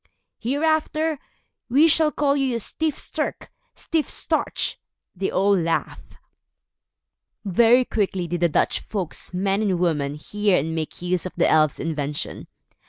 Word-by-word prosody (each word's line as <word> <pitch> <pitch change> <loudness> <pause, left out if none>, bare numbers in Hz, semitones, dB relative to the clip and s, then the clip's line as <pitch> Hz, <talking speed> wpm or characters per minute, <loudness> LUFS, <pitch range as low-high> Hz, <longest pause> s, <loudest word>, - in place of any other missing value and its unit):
"Hereafter, 310 +3 0 0.5
we 285 +7 +5
shall 315 -1 +4
call 280 0 +1
you 270 -3 0
Styf 305 +6 -2
Sterk, - - -4 0.3
Stiff 320 -3 -1
Starch." - - -1 0.4
They 190 +1 -1
all 200 +2 +3
laughed. 165 -2 -2 1.3
Very 235 +6 +5
quickly 195 -5 -1
did 175 +1 -2
the 170 - +4
Dutch - - +1
folks, 190 -6 -4
men 195 +3 0
and 195 -4 +1
women, 150 -5 0
hear 205 +5 0
and 160 +3 -1
make 160 +1 -5
use 180 0 0
of - - -10
the - - +3
elves' 155 -2 +3
invention. 150 -2 -4
195 Hz, 135 wpm, -23 LUFS, 170-270 Hz, 1.3 s, we